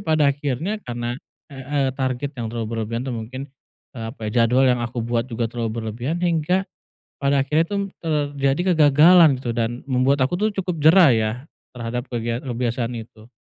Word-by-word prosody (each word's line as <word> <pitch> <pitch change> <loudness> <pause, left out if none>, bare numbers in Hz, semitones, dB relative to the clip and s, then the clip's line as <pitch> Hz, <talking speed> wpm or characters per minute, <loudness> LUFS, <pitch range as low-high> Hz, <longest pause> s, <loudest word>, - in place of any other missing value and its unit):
pada 155 -5 +2
akhirnya 145 - -3
karena, 120 +1 -3 0.3
eee 135 - -9 0.2
eee, - - +1
target 130 +1 -2
yang 115 - -3
terlalu 115 0 -4
berlebihan 115 +2 -3
tuh 130 - -3
mungkin, 120 +3 -6 0.5
eee, 115 -4 -7
apa, 110 -4 -5
ya, 115 +1 +3
jadwal 130 +3 +3
yang 125 -2 +3
aku 120 0 -3
buat 120 +1 -1
juga 115 0 -2
terlalu 115 -2 -2
berlebihan, 120 +8 -3
hingga 175 +2 +1 0.5
pada 140 -1 +1
akhirnya 150 +4 +2
tuh 200 +3 -2 0.2
terjadi 145 +2 0
kegagalan, 155 0 +6
gitu, 120 -3 -3
dan 120 +1 -1
membuat 130 +2 +2
aku 130 +7 +1
tuh 215 +4 +1
cukup 180 -2 -3
jera, 170 +2 +7
ya, 110 -1 +1 0.4
terhadap 120 0 -4
kegia 120 +1 -2
kebiasaan 120 -1 -2
itu. 110 0 -15
130 Hz, 175 wpm, -22 LUFS, 120-150 Hz, 0.5 s, jera